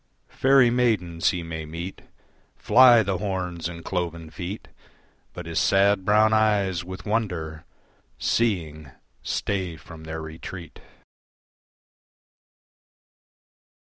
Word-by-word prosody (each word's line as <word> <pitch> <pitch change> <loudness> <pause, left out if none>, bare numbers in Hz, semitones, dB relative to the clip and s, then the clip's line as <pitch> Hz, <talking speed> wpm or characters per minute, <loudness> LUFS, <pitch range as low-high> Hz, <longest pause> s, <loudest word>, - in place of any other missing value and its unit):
Faerie 130 -2 +4
maidens 105 -9 +1
he 90 -2 -3
may 80 -1 -6
meet 85 +4 -7 0.5
Fly 120 -3 +6
the 95 -2 -2
horns 90 -4 -3
and 85 -1 -10
cloven 85 -3 -4
feet, 90 +6 -6 0.6
But, 90 - -8
his 85 -1 -1
sad 100 0 +3
brown 110 +2 +4
eyes 100 -5 +2
with 95 0 -9
wonder 90 -8 -2 0.5
Seeing 80 - -1 0.3
stay 95 -5 -2
from 80 +1 -12
their 80 0 -5
retreat. 80 +2 -9
90 Hz, 100 wpm, -24 LUFS, 85-105 Hz, 0.6 s, Fly